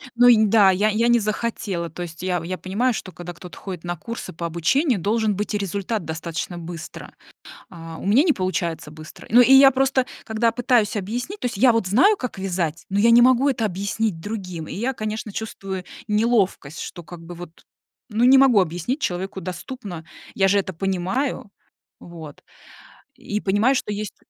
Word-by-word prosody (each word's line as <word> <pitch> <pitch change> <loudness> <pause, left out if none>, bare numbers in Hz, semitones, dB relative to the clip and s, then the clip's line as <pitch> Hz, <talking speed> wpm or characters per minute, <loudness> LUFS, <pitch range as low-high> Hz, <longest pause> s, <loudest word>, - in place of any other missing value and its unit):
Ну 245 +1 +6
и, 220 -3 +6
да, 200 -2 +5
я 205 +3 +2
я 225 +3 +1
не 240 0 +4
захотела. 210 -5 -3
То 175 +3 -7
есть 165 -1 -9
я 180 -2 -1
я 185 +2 -4
понимаю, 230 +7 0
что 190 - -6
когда 175 +1 -8
кто-то 175 +1 -12
ходит 185 -4 -7
на 175 0 -3
курсы 230 +9 -7
по 170 +1 -5
обучению, 195 - +1
должен 215 +2 0
быть 210 +2 -3
и - - +1
результат 200 0 -3
достаточно 165 +2 -5
быстро. 170 -1 -9 0.6
А 165 -2 -9
у - - -7
меня 225 +8 +5
не 325 -2 +3
получается 180 - -3
быстро. 155 0 -12
Ну 240 +3 +7
и 250 +2 +6
я 270 0 +9
просто, 265 -1 +1 0.2
когда 225 +1 +1
пытаюсь 240 -3 +1
объяснить, 245 - -4
то - - -1
есть 240 - -4
я 245 +3 +5
вот 230 -4 0
знаю, 360 - +4
как 250 - -6
вязать, 175 -4 -2
но 200 - 0
я 230 +3 +5
не 240 +1 +7
могу 255 +2 +4
это 245 -4 0
объяснить 200 -1 -2
другим. 185 -6 -6
И - - -6
я, 240 +7 -1
конечно, 215 -2 -5
чувствую 195 -4 -5 0.2
неловкость, 210 -8 0
что 175 - -7
как 170 +1 -11
бы 175 +1 -9
вот, 170 -1 -12 0.4
ну, 225 +1 +1
не 265 +1 +7
могу 255 -7 +6
объяснить 180 - -2
человеку 190 - -3
доступно. 180 0 -7 0.3
Я 195 0 +3
же 200 - +3
это 190 -1 -2
понимаю. 195 - -2 0.5
Вот, 160 -4 -11 0.7
и 215 -5 -4
понимаю, 205 +7 +2
что 210 - -2
есть 210 0 -5
200 Hz, 190 wpm, -22 LUFS, 175-235 Hz, 0.7 s, я